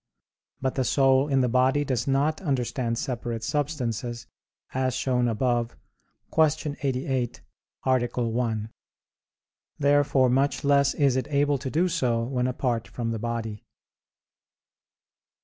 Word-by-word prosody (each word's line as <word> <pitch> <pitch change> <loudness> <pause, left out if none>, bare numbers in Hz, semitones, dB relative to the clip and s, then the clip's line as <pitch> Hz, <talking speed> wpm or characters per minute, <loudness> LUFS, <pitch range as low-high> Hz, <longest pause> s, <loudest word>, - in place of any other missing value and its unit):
But 130 -1 0
the 130 - 0
soul 135 +2 +3
in 135 -2 +2
the 125 - +2
body 130 +4 +2
does 125 -3 -1
not 140 +5 +1
understand 125 -6 -1
separate 120 -2 -3
substances 120 -5 -2 0.5
as 130 -1 0
shown 125 -2 +1
above 120 +1 0 0.6
(Q. 150 -2 +2
88, 130 -2 -1 0.4
A. 130 -2 +2
1). 115 -2 -1 1.1
Therefore 145 -2 +3
much 135 +3 +1
less 140 -1 +3
is 140 -4 +3
it 130 - -1
able 145 -1 +2
to 130 0 -4
do 165 +7 +2
so 125 -10 0
when 125 0 -1
apart 125 -2 -1
from 115 -2 -3
the 115 - -3
body. 115 -2 -4
130 Hz, 125 wpm, -26 LUFS, 120-140 Hz, 1.1 s, soul